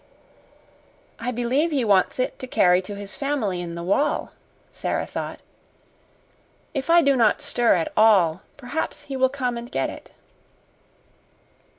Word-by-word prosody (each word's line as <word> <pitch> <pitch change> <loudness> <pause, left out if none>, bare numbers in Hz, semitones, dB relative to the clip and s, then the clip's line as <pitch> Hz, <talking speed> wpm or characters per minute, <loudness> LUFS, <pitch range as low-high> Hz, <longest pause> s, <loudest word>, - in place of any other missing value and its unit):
"I 235 - -3
believe 250 +6 0
he 275 -6 0
wants 195 -3 +3
it 255 - -2
to 255 - -6
carry 180 -6 +4
to 200 +2 -8
his 200 0 -8
family 240 -11 -2
in 170 -1 -6
the 170 - -5
wall," 280 +12 0 0.4
Sara - - -2
thought. - - -6 1.3
"If 275 +1 -3
I 340 0 +6
do 280 -1 +4
not 225 -4 +3
stir 240 -1 +2
at 165 -2 -2
all, 190 -7 +4 0.2
perhaps 285 +3 -4
he 275 -2 -6
will 260 0 +3
come 255 -3 -2
and 240 +2 -10
get - - -1
it." - - -12
240 Hz, 150 wpm, -23 LUFS, 195-275 Hz, 1.3 s, I